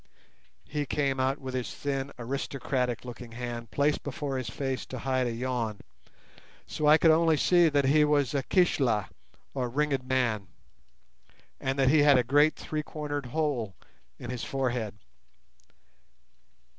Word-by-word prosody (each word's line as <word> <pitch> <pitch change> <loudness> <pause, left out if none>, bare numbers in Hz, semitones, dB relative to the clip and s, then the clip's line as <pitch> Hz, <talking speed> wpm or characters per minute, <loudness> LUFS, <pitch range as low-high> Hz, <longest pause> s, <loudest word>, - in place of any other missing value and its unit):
He 145 0 -3
came 140 -2 0
out 130 +2 +1
with 130 -2 -7
his 125 -2 -3
thin 135 -1 -3
aristocratic 125 -1 -2
looking 120 -1 -9
hand 120 -1 -5
placed 145 +7 +1
before 140 -1 -3
his 125 -3 -4
face 135 +2 -3
to 130 - -6
hide 130 0 0
a - - -1
yawn, 115 -3 -3 0.8
so 150 - -2
I 150 +1 +8
could 165 0 +5
only 160 0 +4
see 175 +1 +4
that 145 -2 +2
he 150 +3 +5
was 145 -3 +2
a 140 - +1
"Keshla" 130 - +2 0.4
or 125 -3 -2
ringed 140 0 0
man, 115 -6 0 1.1
and 135 +1 -2
that 135 -1 +4
he 155 +2 +5
had 145 -2 +6
a 125 - +3
great 145 +5 +4
three 155 -1 -4
cornered 145 -3 -5
hole 125 - -1 0.4
in 120 - -6
his 125 -2 -4
forehead. 125 -6 -2
135 Hz, 150 wpm, -28 LUFS, 125-145 Hz, 1.1 s, I